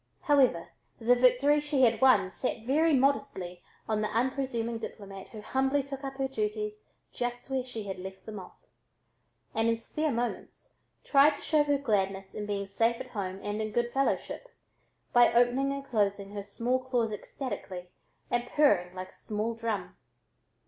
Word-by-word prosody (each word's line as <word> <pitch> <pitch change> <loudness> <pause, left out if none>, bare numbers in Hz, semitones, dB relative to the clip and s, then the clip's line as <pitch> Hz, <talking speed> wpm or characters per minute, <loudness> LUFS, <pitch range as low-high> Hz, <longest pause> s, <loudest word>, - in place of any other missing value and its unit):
However 260 - +3 0.3
the 235 +1 +4
victory 255 +4 +4
she 290 -3 +1
had 230 -2 +4
won 210 -8 +5
sat 230 +2 -3
very 305 +4 +3
modestly 220 -10 0 0.3
on 215 -1 0
the 215 - +1
unpresuming 235 -1 -1
diplomat 195 -3 -8
who 215 - -10
humbly 265 +5 +1
took 275 0 -7
up 270 0 -5
her 270 0 -1
duties 210 -3 -3 0.2
just 245 +2 -4
where 260 -1 0
she 240 -4 -6
had 195 -2 -5
left 190 +1 -9
them 215 -2 -6
off, 185 - -11 1.0
and 225 +1 +1
in 230 0 +2
spare 305 +6 -2
moments 240 0 -4 0.2
tried 285 +1 +5
to - - -12
show 305 -2 +3
her 290 -1 +2
gladness 195 -7 -1
in 210 -1 -5
being 200 -1 -2
safe 230 +4 +1
at - - -8
home 195 -3 -4
and 205 +1 -2
in 215 0 -3
good 240 +1 0
fellowship, 275 - -1 0.7
by 240 -1 +7
opening 245 +3 +3
and 275 0 -4
shutting 200 -2 0
her 205 -1 -5
small 235 +5 -1
claws 245 -4 0
ecstatically 190 -5 -6 0.4
and 240 0 +1
purring 190 -12 +3
like 185 0 -6
a - - -24
small 215 +2 -3
drum. 225 -2 -3
230 Hz, 170 wpm, -29 LUFS, 205-265 Hz, 1.0 s, by